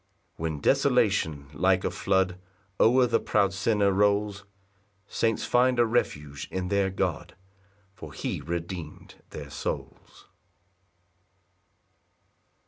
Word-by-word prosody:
6 -, -, -39 dB
When 80 Hz, -3 st, -3 dB
desolation 75 Hz, -3 st, +2 dB
like 95 Hz, +2 st, +2 dB
a -, -, -1 dB
flood, 95 Hz, -2 st, 0 dB, 0.4 s
O'er 125 Hz, +3 st, +5 dB
the 115 Hz, -1 st, +2 dB
proud 100 Hz, -4 st, +1 dB
sinner 100 Hz, 0 st, +2 dB
rolls, 100 Hz, 0 st, +1 dB, 0.6 s
Saints 115 Hz, -1 st, 0 dB
find 125 Hz, +1 st, +3 dB
a 120 Hz, -, +5 dB
refuge 75 Hz, -, -2 dB
in 90 Hz, -1 st, -3 dB
their 100 Hz, -1 st, +2 dB
God, 95 Hz, -4 st, -3 dB, 0.6 s
For -, -, -10 dB
he -, -, -4 dB
redeem'd 85 Hz, 0 st, -6 dB
their 70 Hz, -2 st, -9 dB
souls. 70 Hz, -, -6 dB
95 Hz, 110 wpm, -27 LUFS, 80-105 Hz, 0.6 s, O'er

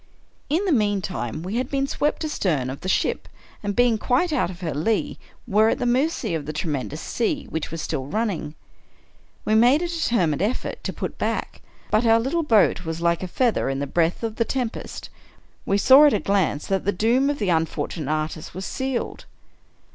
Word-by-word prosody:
In 335 Hz, +8 st, +1 dB
the 375 Hz, -, +1 dB
meantime, 195 Hz, -, -1 dB
we 195 Hz, +6 st, -3 dB
had 255 Hz, +1 st, -1 dB
been 275 Hz, -1 st, 0 dB
swept 295 Hz, +3 st, -1 dB
astern 155 Hz, -, -1 dB
of 135 Hz, -, -8 dB
the 185 Hz, -, -3 dB
ship, -, -, 0 dB, 0.3 s
and 205 Hz, -1 st, -3 dB
being 240 Hz, -3 st, +3 dB
quite 305 Hz, +10 st, +1 dB
out 295 Hz, -, +1 dB
of 180 Hz, 0 st, -9 dB
her 165 Hz, -4 st, -2 dB
lee, 165 Hz, +11 st, -1 dB, 0.3 s
were 215 Hz, 0 st, +4 dB
at -, -, +1 dB
the -, -, -2 dB
mercy 255 Hz, -, +1 dB
of 155 Hz, -3 st, -3 dB
the 155 Hz, -, -3 dB
tremendous 150 Hz, -1 st, -3 dB
sea 275 Hz, -, -2 dB
which 160 Hz, -1 st, -3 dB
was 165 Hz, -1 st, -5 dB
still 140 Hz, -5 st, -3 dB
running. 185 Hz, -6 st, -2 dB, 0.9 s
We 215 Hz, -, +1 dB
made 245 Hz, +9 st, +5 dB
a -, -, -1 dB
deter 245 Hz, -, +1 dB
mined 155 Hz, 0 st, -1 dB
effort 220 Hz, +6 st, -2 dB
to -, -, -1 dB
put -, -, -6 dB
back, -, -, -2 dB, 0.3 s
but 215 Hz, +2 st, +3 dB
our 225 Hz, 0 st, +6 dB
little 270 Hz, +9 st, 0 dB
boat 220 Hz, -, +3 dB
was 160 Hz, -1 st, -4 dB
like 170 Hz, 0 st, +1 dB
a 185 Hz, -, -3 dB
feather 235 Hz, -, +1 dB
in 135 Hz, -, -1 dB
the 140 Hz, -, -2 dB
breath 165 Hz, -, 0 dB
of 225 Hz, -1 st, -3 dB
the 230 Hz, -, +3 dB
tempest. 245 Hz, -1 st, -4 dB, 0.6 s
We 200 Hz, -, +2 dB
saw 265 Hz, +7 st, +8 dB
at 290 Hz, -, +3 dB
a -, -, +2 dB
glance 190 Hz, -7 st, 0 dB
that 195 Hz, -1 st, -1 dB
the 200 Hz, -, +1 dB
doom 235 Hz, +8 st, +2 dB
of 290 Hz, -, -1 dB
the 205 Hz, -7 st, -1 dB
unfortunate 160 Hz, -2 st, -1 dB
artist 155 Hz, +1 st, -3 dB
was 190 Hz, +1 st, -5 dB
sealed. 265 Hz, -2 st, -3 dB
205 Hz, 200 wpm, -23 LUFS, 165-250 Hz, 0.9 s, saw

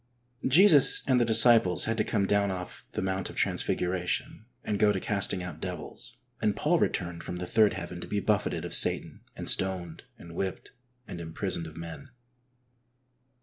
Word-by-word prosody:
Jesus 155 Hz, 0 st, +6 dB
and 130 Hz, -2 st, +2 dB
the -, -, +3 dB
disciples 115 Hz, -5 st, +6 dB
had 115 Hz, -, -1 dB
to -, -, +3 dB
come 100 Hz, -3 st, -1 dB
down 100 Hz, 0 st, +1 dB
off 90 Hz, -1 st, -7 dB
the -, -, -3 dB
Mount 95 Hz, 0 st, -3 dB
of -, -, -11 dB
Transfiguration 95 Hz, -, -2 dB, 0.2 s
and 105 Hz, -2 st, -3 dB
go 105 Hz, 0 st, +4 dB
to 100 Hz, -, -2 dB
casting 100 Hz, -2 st, 0 dB
out 90 Hz, -, -8 dB
devils, -, -, -5 dB, 0.2 s
and 105 Hz, -2 st, +1 dB
Paul 160 Hz, +9 st, +1 dB
returned 85 Hz, -1 st, -2 dB
from 90 Hz, -, -6 dB
the 90 Hz, 0 st, -5 dB
third 110 Hz, +2 st, +3 dB
heaven 85 Hz, -1 st, -7 dB
to -, -, -7 dB
be 105 Hz, -, -2 dB
buffeted 105 Hz, 0 st, -1 dB
of -, -, -5 dB
Satan, -, -, 0 dB
and -, -, -7 dB
stoned, 90 Hz, -3 st, 0 dB
and 85 Hz, -1 st, -12 dB
whipped, 95 Hz, +2 st, -5 dB, 0.4 s
and 85 Hz, -, -7 dB
imprisoned 85 Hz, +1 st, -5 dB
of 80 Hz, +1 st, -12 dB
men. 85 Hz, +12 st, -9 dB
95 Hz, 175 wpm, -28 LUFS, 90-110 Hz, 0.4 s, Jesus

